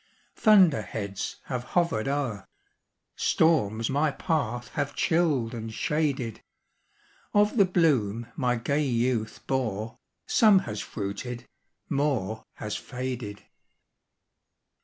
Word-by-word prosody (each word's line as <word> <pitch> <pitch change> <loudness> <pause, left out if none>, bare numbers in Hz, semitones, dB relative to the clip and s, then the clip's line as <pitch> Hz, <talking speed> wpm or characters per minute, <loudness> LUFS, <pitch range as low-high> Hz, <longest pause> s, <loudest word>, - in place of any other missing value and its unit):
Thunder 190 - +5
heads 100 -2 -4
have 125 -2 -4
hovered 170 -10 +2
o'er 135 -8 -2 0.7
Storms 115 -9 +2
my 145 +3 +2
path 135 -5 -2
have 145 -1 -3
chilled 155 -9 +1
and 115 -1 -5
shaded; 135 -3 -1 0.9
Of 210 +2 +4
the 200 - +7
bloom 130 - +2
my 125 -2 +1
gay 140 +6 0
youth 120 -3 -1
bore, 115 -5 -2 0.3
Some 215 -3 +5
has 105 -2 -4
fruited 120 +4 -5 0.4
more 130 -7 -1
has 105 -1 -4
faded." 125 -5 -5
125 Hz, 100 wpm, -27 LUFS, 110-150 Hz, 0.9 s, the